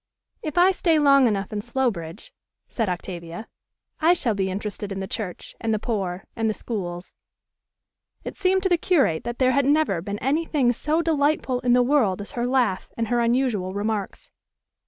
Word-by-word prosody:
"If 310 +1 -5
I 360 +2 +6
stay 335 -4 +2
long 275 -3 +5
enough 200 -2 -2
in 205 - -2
Slowbridge," 235 - -3 0.3
said 225 -5 -2
Octavia, 175 +2 -6 0.5
"I 330 +2 +5
shall 245 -10 0
be 190 -1 -1
interested 205 +1 -5
in 195 - -4
the 190 - -3
church, 190 -2 -6
and 225 - -1
the - - 0
poor, 195 -5 -3
and 225 -1 0
the 215 - -1
schools." 180 -6 -6 1.1
It - - -6
seemed 380 0 +1
to 380 - +2
the 350 -2 +3
curate 275 - +2
that 240 0 -4
there 255 -1 +3
had 280 0 +2
never 290 - +2
been 200 +3 -4
any 285 +9 0
thing 255 -6 +2
so 310 +7 0
delightful 290 -5 +1
in 245 -1 +2
the 250 0 +5
world 245 -8 +2
as 205 - -7
her 240 0 -2
laugh 245 -7 +1
and 230 -1 -2
her 240 0 +2
unusual 235 -6 +1
remarks. 205 0 -3
235 Hz, 185 wpm, -24 LUFS, 200-280 Hz, 1.1 s, I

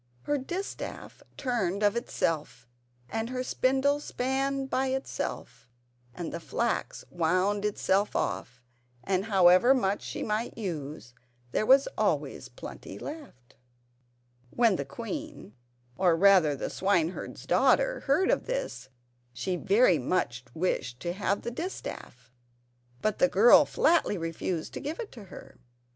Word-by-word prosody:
Her 290 -1 0
distaff 355 +9 -6 0.2
turned 210 -7 -1
of 205 +1 +3
itself 165 - -2 0.4
and 225 - -3
her 255 0 -2
spindle 270 +3 +1
span 270 0 -1
by 265 0 0
itself 265 - -4 0.5
and 170 -2 -5
the 170 - -3
flax 235 +8 -2
wound 185 +4 +1
itself 205 -1 +1
off; 125 0 -3 0.4
and 190 0 0
however 195 +4 +6
much 200 -5 0
she - - -5
might 215 +3 -2
use 150 - -5 0.4
there 215 - 0
was 270 +1 +6
always - - -1
plenty - - -9
left. 280 - -10 1.0
When 230 - +3
the 140 - -3
queen—or, 140 - -4
rather, 185 -5 +5
the - - -4
swineherd's 185 -3 -1
daughter—heard 380 - +3
of - - 0
this, - - -4 0.4
she 125 +10 -2
very 195 -2 +4
much 125 -3 -1
wished 130 -8 -1
to 175 0 -2
have 200 +1 -1
the 235 - -3
distaff, 235 - -7 0.7
but 215 - 0
the 180 - +5
girl 220 +6 +7
flatly 330 - +2
refused 165 0 -3
to - - -5
give 300 +4 -5
it 460 - -6
to 220 -5 -11
her. 185 - -13
200 Hz, 125 wpm, -28 LUFS, 165-260 Hz, 1.0 s, girl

